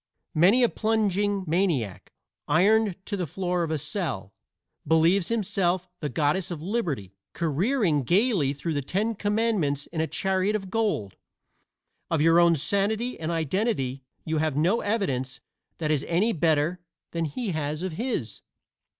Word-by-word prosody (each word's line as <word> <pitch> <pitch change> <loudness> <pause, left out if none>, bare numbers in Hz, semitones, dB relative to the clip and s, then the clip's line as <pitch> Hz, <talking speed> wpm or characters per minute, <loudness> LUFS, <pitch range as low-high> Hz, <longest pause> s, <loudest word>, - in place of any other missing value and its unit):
Many 195 +11 +5
a 240 - +5
plunging 205 -2 0
maniac, 155 - -1 0.4
ironed 210 +2 +3
to 205 - -2
the 180 -4 -2
floor 180 +2 -1
of 165 - -1
a 160 - 0
cell, 145 - -4 0.5
believes 165 +3 +3
himself 190 -5 0
the 150 - -3
Goddess 155 +6 0
of 170 -4 -5
Liberty 155 - -3 0.2
careering 170 - +1
gaily 180 - +2
through 145 +4 -3
the 145 - -1
Ten 205 - -1
Commandments 205 -9 0
in 165 -2 -3
a 160 - 0
chariot 190 +3 0
of 195 -3 -4
gold. 205 - -1 0.9
Of 165 - +1
your 165 +2 +5
own 170 -1 +5
sanity 210 - -1
and 160 0 -3
identity 160 - -1 0.2
you 160 -1 0
have 155 -2 0
no 180 +10 +2
evidence 140 - -1 0.4
that 155 -2 -1
is 145 -3 +1
any 195 +7 +2
better 160 +1 +1 0.3
than 165 -1 -1
he 195 - -3
has 155 0 -3
of 185 - -2
his. 215 - -3
175 Hz, 150 wpm, -26 LUFS, 150-205 Hz, 0.9 s, Many